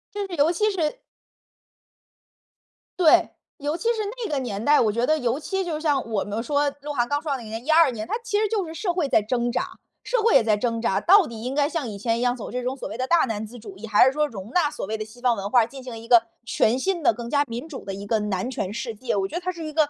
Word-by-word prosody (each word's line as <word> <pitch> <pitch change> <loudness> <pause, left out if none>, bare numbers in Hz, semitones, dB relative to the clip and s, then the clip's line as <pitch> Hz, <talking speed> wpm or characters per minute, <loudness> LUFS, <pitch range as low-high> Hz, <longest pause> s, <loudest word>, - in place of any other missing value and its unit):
就 410 - -2
是 360 - -6
尤 295 +2 +3
其 425 +5 +1
是 345 +3 -1 2.0
对， 340 -4 +5 0.3
尤 295 +1 -2
其 345 - -7
是 470 -2 0 0.3
那 405 - -4
个 285 - 0
年 220 -5 -4
代， 295 +4 +5
我 220 -3 +3
觉 235 +3 0
得 310 +3 +2
尤 250 -1 -1
其 385 +4 -2
就 335 -3 -2
是 305 - -5
像 290 -4 +1
我 215 -3 0
们 205 +2 -3
说 285 +3 +1
鹿 295 +1 -5
晗 240 -3 +1
刚 285 +3 -1
出 315 - -5
来 275 - 0
那 240 - -9
年 225 +2 -7
12 320 0 +5
年 220 -2 -6
他 - - -4
其 420 -3 0
实 430 - +2
就 410 -3 -1
是 320 - -7
社 355 +1 -1
会 340 -5 0
在 220 - +4
挣 240 +3 -1
扎 - - -3 0.2
社 - - 0
会 460 - +4
也 265 - +7
在 220 -1 +3
挣 230 +1 -1
扎。 195 -4 +1
到 390 +1 +6
底 230 -4 -8
应 255 +3 -4
该 285 -1 +3
像 305 -4 -3
以 210 -2 -6
前 230 +3 0
一 - - -2
样 245 0 +2
走 235 - -7
这 250 - -3
种 255 +2 -2
所 - - -5
谓 220 - -7
的 255 +1 -2
大 340 +3 +4
男 220 -3 -3
子 235 +3 -11
主 205 -4 -11
义， 220 +3 -8
还 210 +2 +6
是 260 - +4
说 300 +1 +1
容 210 -3 -9
纳 340 -3 +2
所 - - -5
谓 220 +3 -3
的 215 - -4
西 225 +3 -16
方 245 -2 +3
文 200 -1 -4
化， 235 0 +5
进 265 +4 -10
行 245 -3 -7
一 225 +1 -10
个 235 -1 +7 0.2
全 235 -1 +2
新 365 +4 -1
的 275 - +4
更 235 +1 -7
加 285 +1 +3
民 240 +5 -6
主 285 - -8
的 195 - -4
一 200 +1 -7
个 220 +1 +1
男 210 +1 -2
权 205 -5 -3
世 235 +1 -4
界。 235 +2 -3
我 195 -1 0
觉 - - -9
得 350 - -2
他 365 +1 -2
是 335 -2 -8
一 310 - -5
个 305 -1 +3
255 Hz, 315 characters per minute, -24 LUFS, 225-310 Hz, 2.0 s, 也